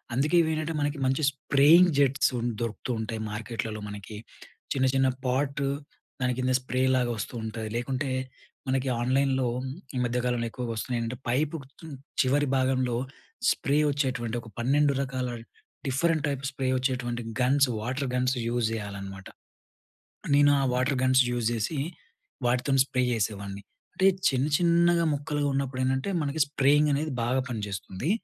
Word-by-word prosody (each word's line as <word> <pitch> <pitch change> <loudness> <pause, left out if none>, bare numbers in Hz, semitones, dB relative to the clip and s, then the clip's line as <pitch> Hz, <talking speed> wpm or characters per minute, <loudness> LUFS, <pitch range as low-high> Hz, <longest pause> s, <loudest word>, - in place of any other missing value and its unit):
అందుకే 150 +7 +2
ఇవి 160 - 0
ఏంటంటే 155 +1 -2
మనకి, 145 +1 -1
మంచి 135 +4 +1
స్ప్రేయింగ్ 155 +6 +5
జెట్సు 140 0 +3
ఉ - - -3 0.2
దొరుకుతూ 115 +2 -4
ఉంటాయి 110 0 -4
మార్కెట్‌లలో 110 0 -4
మనకి. 105 +1 -8 0.6
చిన్న, 130 -1 +1
చిన్న 135 0 +4 0.2
పాటు, 140 +2 0 0.5
దాని 125 0 +1
కింద 130 0 0
స్ప్రే 130 0 -1
లాగా 120 -1 +1
వస్తూ 105 - -5
ఉంటుంది. 110 0 -4
లేకుంటే, 130 +3 -2 0.6
మనకి 130 0 0
ఆన్‍లైన్‍లో, 130 0 +2 0.5
ఈ - - -1
మధ్యకాలంలో 120 -1 0
ఎక్కువగా 125 -1 -4
వస్తున్నాయి 120 +2 -2
ఏంటంటే. 115 +1 -4
పైపు 145 +6 +1 0.3
హ్మ్, 160 -3 -7 0.3
చివరి 140 +2 +2
భాగంలో 130 -2 +1 0.6
స్ప్రే 140 +2 0
వచ్చేటువంటి 130 -5 -1
ఒక, 110 - -14
12 140 +4 +3
రకాల, 130 -2 -2 0.6
డిఫరెంట్ 155 +3 +1
టైప్ 140 -1 -3
స్ప్రే 135 -2 -3
వచ్చేటువంటి 125 -2 -1 0.2
గన్స్, 135 +2 +4
వాటర్ 130 +4 -2
గన్స్ 125 +1 +1
యూజ్ 120 -1 0
జేయాలనమాట. 100 -2 -6 1.1
నేను 145 0 +6
ఆ - - +1
వాటర్ 130 +2 +1
గన్స్ 130 0 +5
యూజ్ 120 -2 0
జేసి, 115 +7 -2 0.7
వాటితోని 130 +2 +2
స్ప్రే 130 -2 -1
చేసేవాడిని. 100 -2 -3 0.3
అంటే 190 - +3 0.2
చిన్న, 135 +1 +1
చిన్నగా 170 0 +3
మొక్కలుగా 145 0 -1
ఉన్నప్పుడు 135 -1 -2
ఏంటంటే, 130 +6 0
మనకి 145 +1 -2
స్ప్రేయింగ్ 145 +1 +3
అనేది 150 +1 -1
బాగా 130 +2 +1
పనిచేస్తుంది. 100 - -4
130 Hz, 140 wpm, -27 LUFS, 120-140 Hz, 1.1 s, నేను